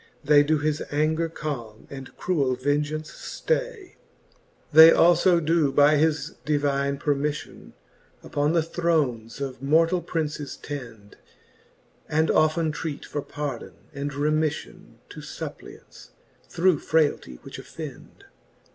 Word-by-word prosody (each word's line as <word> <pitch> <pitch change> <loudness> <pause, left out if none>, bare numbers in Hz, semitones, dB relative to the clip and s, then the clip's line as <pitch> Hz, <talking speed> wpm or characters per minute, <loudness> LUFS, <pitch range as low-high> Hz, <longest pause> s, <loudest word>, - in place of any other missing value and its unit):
They 145 0 +6
doe 155 +2 +2
his 150 +1 -1
anger 155 +3 0
calme, 125 -9 -6
and 135 -1 -10
cruell 140 -8 0
vengeance 150 +3 -1
ftay. - - -10
XXXII. 485 -7 -11 0.8
They 160 +1 +10
alfo 175 +1 +5
doe 160 -3 +2
by 145 +2 +5
his 155 0 0
divine 140 -1 0
permiffion 145 +1 -3 0.5
Upon 145 +2 0
the 165 -2 +2
thrones 150 -10 -1
of 135 -3 -5
mortall 165 +5 +2
Princes 150 -4 -4
tend, 115 -8 -9 0.9
And 160 +1 +2
often 155 +1 +2
treat 150 -1 -5
for 145 - -4
pardon 145 -4 -6 0.2
and 140 +1 -4
reraifllon 150 +2 -2 0.2
To - - -10
fuppliants, - - -10 0.4
through 180 -2 +2
frayltie 150 - 0
which - - -9
offend. - - -10
150 Hz, 120 wpm, -25 LUFS, 140-160 Hz, 0.9 s, They